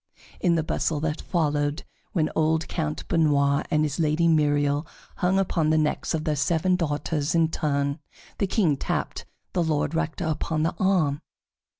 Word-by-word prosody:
In 175 Hz, -5 st, +2 dB
the 160 Hz, -, +1 dB
bustle 155 Hz, -1 st, -1 dB
that 155 Hz, 0 st, -2 dB
followed, 150 Hz, -2 st, 0 dB, 0.3 s
when 160 Hz, -7 st, 0 dB
old 160 Hz, 0 st, +1 dB
Count 155 Hz, -3 st, -3 dB
Benoît 145 Hz, -4 st, +2 dB
and 155 Hz, 0 st, +2 dB
his 150 Hz, +1 st, -2 dB
Lady 160 Hz, +1 st, +2 dB
Myriel 145 Hz, -1 st, +2 dB, 0.3 s
hung 180 Hz, +2 st, +2 dB
upon 170 Hz, -5 st, +1 dB
the 155 Hz, -, +3 dB
necks 155 Hz, +1 st, 0 dB
of 155 Hz, -, -3 dB
their 155 Hz, -2 st, 0 dB
seven 170 Hz, +5 st, +1 dB
daughters 150 Hz, -1 st, -1 dB
in 165 Hz, -1 st, +3 dB
turn, 140 Hz, -1 st, -1 dB, 0.4 s
the 200 Hz, -, +1 dB
King 175 Hz, -8 st, +2 dB
tapped -, -, -3 dB, 0.3 s
the 180 Hz, -, +1 dB
Lord 155 Hz, -2 st, 0 dB
Rector 165 Hz, 0 st, -2 dB
upon 155 Hz, 0 st, -1 dB
the 165 Hz, -, 0 dB
arm. 165 Hz, -7 st, +2 dB
155 Hz, 165 wpm, -25 LUFS, 150-165 Hz, 0.4 s, the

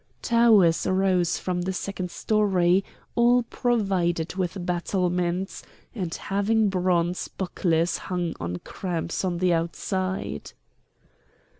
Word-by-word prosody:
Towers 215 Hz, -, +4 dB
rose 185 Hz, -2 st, +2 dB
from 180 Hz, -1 st, -2 dB
the 190 Hz, +2 st, -2 dB
second 185 Hz, -1 st, -4 dB
story, 190 Hz, -2 st, +2 dB, 0.3 s
all 245 Hz, +1 st, +4 dB
provided 195 Hz, -9 st, 0 dB
with 185 Hz, 0 st, -3 dB
battlements, 180 Hz, +1 st, -1 dB, 0.3 s
and 185 Hz, -8 st, -3 dB
having 205 Hz, +2 st, +1 dB
bronze 180 Hz, -2 st, 0 dB
bucklers 175 Hz, -2 st, 0 dB
hung 175 Hz, -2 st, -1 dB
on 85 Hz, +1 st, -3 dB
cramps 170 Hz, -2 st, -3 dB
on 180 Hz, -2 st, -1 dB
the 180 Hz, 0 st, +2 dB
outside. 170 Hz, -, -2 dB
185 Hz, 105 wpm, -25 LUFS, 175-195 Hz, 0.3 s, Towers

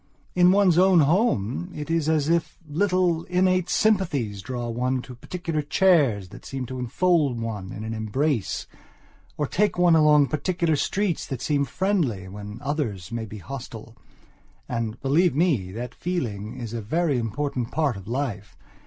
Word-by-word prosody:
In 180 Hz, 0 st, +5 dB
one's 190 Hz, -3 st, +4 dB
own 185 Hz, -2 st, +6 dB
home 155 Hz, -, +1 dB
it 150 Hz, +2 st, -5 dB
is 165 Hz, -2 st, +1 dB
as 155 Hz, -2 st, +2 dB
if 170 Hz, 0 st, 0 dB
little, 180 Hz, +1 st, +1 dB
innate 185 Hz, 0 st, +2 dB
sympathies 145 Hz, -, +1 dB
draw 120 Hz, +3 st, -4 dB
one 125 Hz, +2 st, -1 dB
to 130 Hz, -, -10 dB
particular 165 Hz, +5 st, -4 dB
chairs 145 Hz, -, +3 dB
that -, -, -12 dB
seem 135 Hz, -2 st, -5 dB
to 130 Hz, +1 st, -6 dB
enfold 140 Hz, 0 st, +1 dB
one 105 Hz, -5 st, -4 dB
in 105 Hz, -, -7 dB
an 110 Hz, +1 st, -4 dB
embrace, 115 Hz, +3 st, -1 dB, 0.7 s
or 150 Hz, -, 0 dB
take 200 Hz, +7 st, 0 dB
one 175 Hz, -2 st, +5 dB
along 150 Hz, -2 st, +6 dB
particular 160 Hz, +2 st, 0 dB
streets 190 Hz, +4 st, -1 dB
that 135 Hz, -4 st, -4 dB
seem 140 Hz, 0 st, +1 dB
friendly 145 Hz, -, -1 dB
when 105 Hz, +2 st, -8 dB
others 120 Hz, -, -3 dB
may 115 Hz, -1 st, -3 dB
be 105 Hz, -, -8 dB
hostile. 115 Hz, 0 st, -8 dB, 0.7 s
And, 115 Hz, -1 st, -3 dB
believe 155 Hz, +4 st, +3 dB
me, 140 Hz, -, +1 dB
that 120 Hz, +3 st, -5 dB
feeling 115 Hz, -, -3 dB
is 115 Hz, -2 st, -6 dB
a 115 Hz, -, -3 dB
very 145 Hz, +4 st, 0 dB
important 120 Hz, +2 st, -2 dB
part 150 Hz, -5 st, 0 dB
of 95 Hz, -1 st, -10 dB
life. 110 Hz, -6 st, -4 dB
140 Hz, 160 wpm, -25 LUFS, 115-170 Hz, 0.7 s, own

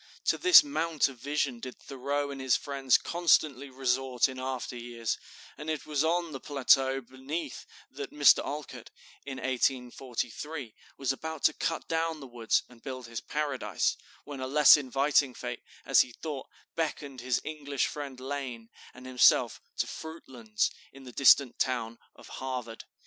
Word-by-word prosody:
To -, -, +2 dB
this 365 Hz, -3 st, +9 dB
mount 165 Hz, -, +1 dB
of 130 Hz, -3 st, -13 dB
vision 140 Hz, -2 st, -1 dB
did 130 Hz, +1 st, -8 dB
Thoreau 140 Hz, +1 st, -3 dB
and 135 Hz, -1 st, -6 dB
his 130 Hz, -2 st, +3 dB
friends 135 Hz, -3 st, +2 dB
constantly 155 Hz, -5 st, +2 dB
resort 130 Hz, -1 st, +1 dB
in 130 Hz, -1 st, -8 dB
after 130 Hz, -1 st, -4 dB
years, 120 Hz, -1 st, -4 dB, 0.4 s
and 150 Hz, +1 st, -5 dB
it 155 Hz, -2 st, -3 dB
was 150 Hz, -1 st, 0 dB
on 170 Hz, 0 st, 0 dB
the 135 Hz, -, -6 dB
plateau 135 Hz, -1 st, +3 dB
beneath 135 Hz, +4 st, -6 dB, 0.2 s
that 140 Hz, +1 st, -6 dB
Mr. 145 Hz, -1 st, +6 dB
Alcott, 150 Hz, 0 st, -6 dB, 0.4 s
in 135 Hz, -1 st, -5 dB
1843, 130 Hz, +1 st, -2 dB, 0.2 s
was 135 Hz, -1 st, 0 dB
about 160 Hz, +2 st, -6 dB
to -, -, +5 dB
cut 165 Hz, +1 st, -2 dB
down 165 Hz, -1 st, -1 dB
the 140 Hz, -, -9 dB
woods 120 Hz, -3 st, 0 dB
and 120 Hz, -2 st, -18 dB
build 130 Hz, -3 st, -6 dB
his 115 Hz, -1 st, -6 dB
Paradise, 150 Hz, -3 st, -1 dB, 0.3 s
when 145 Hz, -2 st, -8 dB
a 130 Hz, -, -3 dB
less 150 Hz, +1 st, +8 dB
inviting 140 Hz, -1 st, +1 dB
fate, -, -, -5 dB, 0.2 s
as -, -, +6 dB
he 125 Hz, -, -3 dB
thought, 145 Hz, 0 st, -6 dB, 0.3 s
beckoned 145 Hz, -5 st, -3 dB
his 125 Hz, -1 st, 0 dB
English 145 Hz, -3 st, -2 dB
friend 140 Hz, -3 st, -6 dB
Lane 130 Hz, -4 st, -5 dB, 0.3 s
and 125 Hz, +1 st, -12 dB
himself 130 Hz, -1 st, +4 dB, 0.2 s
to -, -, +1 dB
"Fruitlands," 130 Hz, -9 st, -3 dB, 0.2 s
in 135 Hz, 0 st, -14 dB
the 125 Hz, -, -10 dB
distant 135 Hz, 0 st, +5 dB
town 115 Hz, -3 st, -1 dB, 0.2 s
of -, -, -15 dB
Harvard. 125 Hz, -4 st, -6 dB
135 Hz, 160 wpm, -29 LUFS, 125-150 Hz, 0.4 s, this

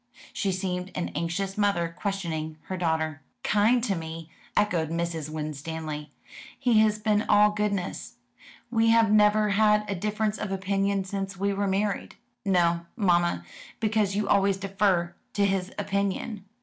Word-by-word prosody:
She 195 Hz, -, 0 dB
seemed 185 Hz, 0 st, -3 dB
an 180 Hz, -, -2 dB
anxious 185 Hz, +6 st, -3 dB
mother 200 Hz, -5 st, +2 dB
questioning 165 Hz, -7 st, -3 dB
her 190 Hz, -, -5 dB
daughter. 160 Hz, -4 st, -1 dB, 0.2 s
"Kind 225 Hz, +4 st, +3 dB
to 215 Hz, -5 st, +1 dB
me," 165 Hz, -1 st, -6 dB, 0.3 s
echoed 175 Hz, -7 st, +2 dB
Mrs. 165 Hz, -2 st, -2 dB
Winstanley. 155 Hz, 0 st, -5 dB, 0.5 s
"He 235 Hz, -3 st, +3 dB
has 215 Hz, -1 st, +4 dB
been 210 Hz, -1 st, +2 dB
all 210 Hz, 0 st, +6 dB
goodness. 205 Hz, -3 st, -2 dB, 0.6 s
We 225 Hz, -1 st, +3 dB
have 225 Hz, -2 st, +5 dB
never 210 Hz, 0 st, +5 dB
had 210 Hz, +1 st, +3 dB
a 200 Hz, -, -1 dB
difference 210 Hz, +3 st, -1 dB
of 215 Hz, -2 st, -3 dB
opinion 195 Hz, 0 st, 0 dB
since 195 Hz, 0 st, -4 dB
we 200 Hz, +1 st, 0 dB
were 200 Hz, 0 st, 0 dB
married." 195 Hz, +1 st, -1 dB, 0.3 s
"No, 170 Hz, -3 st, +2 dB
mamma, 175 Hz, -, +2 dB, 0.3 s
because 215 Hz, -3 st, +1 dB
you 210 Hz, -, 0 dB
always 195 Hz, -1 st, +3 dB
defer 195 Hz, -3 st, +1 dB, 0.2 s
to 200 Hz, -, +2 dB
his 190 Hz, -1 st, 0 dB
opinion." 200 Hz, +1 st, -2 dB
195 Hz, 145 wpm, -27 LUFS, 170-210 Hz, 0.6 s, all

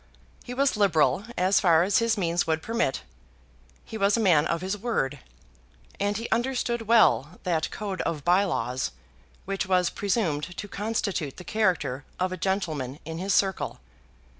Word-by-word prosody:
He 245 Hz, -, -7 dB
was 275 Hz, 0 st, +2 dB
liberal 180 Hz, -4 st, +2 dB
as 185 Hz, +1 st, +3 dB
far 170 Hz, -4 st, +4 dB
as 200 Hz, +7 st, +3 dB
his 230 Hz, -1 st, +1 dB
means 175 Hz, -3 st, 0 dB
would 160 Hz, 0 st, 0 dB
permit; 230 Hz, -, -1 dB, 0.8 s
he 220 Hz, -, -7 dB
was 200 Hz, +3 st, +3 dB
a -, -, 0 dB
man 175 Hz, -9 st, +4 dB
of 170 Hz, 0 st, -1 dB
his 190 Hz, +2 st, -2 dB
word; 190 Hz, -, -2 dB, 0.8 s
and 205 Hz, 0 st, 0 dB
he 230 Hz, -, -4 dB
understood 235 Hz, -1 st, 0 dB
well 200 Hz, -, +4 dB
that 165 Hz, -3 st, 0 dB
code 200 Hz, -3 st, -4 dB
of 160 Hz, -4 st, -3 dB
by 180 Hz, +3 st, +4 dB
laws 130 Hz, -, -2 dB, 0.5 s
which 195 Hz, 0 st, -2 dB
was 180 Hz, -2 st, +2 dB
presumed 175 Hz, -6 st, -1 dB
to 205 Hz, -, -5 dB
constitute 200 Hz, -9 st, -2 dB
the 180 Hz, -, -8 dB
character 160 Hz, -8 st, 0 dB, 0.2 s
of 185 Hz, 0 st, 0 dB
a -, -, -2 dB
gentleman 160 Hz, -8 st, -2 dB
in 160 Hz, +1 st, -5 dB
his 190 Hz, +1 st, 0 dB
circle. 190 Hz, -2 st, 0 dB
185 Hz, 165 wpm, -26 LUFS, 160-210 Hz, 0.8 s, far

